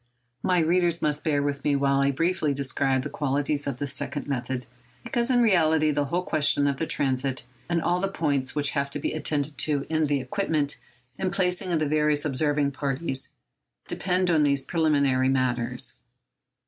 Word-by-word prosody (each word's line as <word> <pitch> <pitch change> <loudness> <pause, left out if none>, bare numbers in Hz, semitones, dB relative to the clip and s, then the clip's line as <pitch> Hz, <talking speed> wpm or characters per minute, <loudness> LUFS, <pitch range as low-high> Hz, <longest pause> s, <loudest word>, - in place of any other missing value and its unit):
My 180 -1 +1
readers 170 0 +2
must 150 -1 0
bear 145 -3 +1
with 140 -1 -2
me 145 -1 +2
while 140 0 +2
I 140 0 +3
briefly 160 0 0
describe 135 -1 0
the - - -4
qualities 145 +1 0
of 135 -3 -3
this 140 0 -1
second 145 0 -4
method, 130 -2 -3 0.4
because 240 -1 0
in 245 -2 +4
reality 160 -7 +3
the 145 0 0
whole 175 +6 -1
question 145 -3 +3
of 140 -1 0
the 160 - -2
transit, 130 -1 -1 0.2
and 170 -1 +1
all 175 +1 +1
the 195 - +1
points 145 -8 -1
which 145 -1 +2
have 140 -1 -1
to 145 - -5
be - - -2
attended 145 -2 -2
to 145 -2 0
in 155 -1 +2
the 145 -1 0
equipment 155 -3 -2 0.4
and 185 -1 -1
placing 180 0 -1
of 170 - +2
the 155 - 0
various 150 0 +1
observing 145 0 +1
parties, 135 0 -1 0.5
depend 180 -1 0
on 160 -2 +3
these 140 -2 +2
preliminary 140 -5 +2
matters. 125 -2 0
145 Hz, 180 wpm, -26 LUFS, 140-165 Hz, 0.5 s, in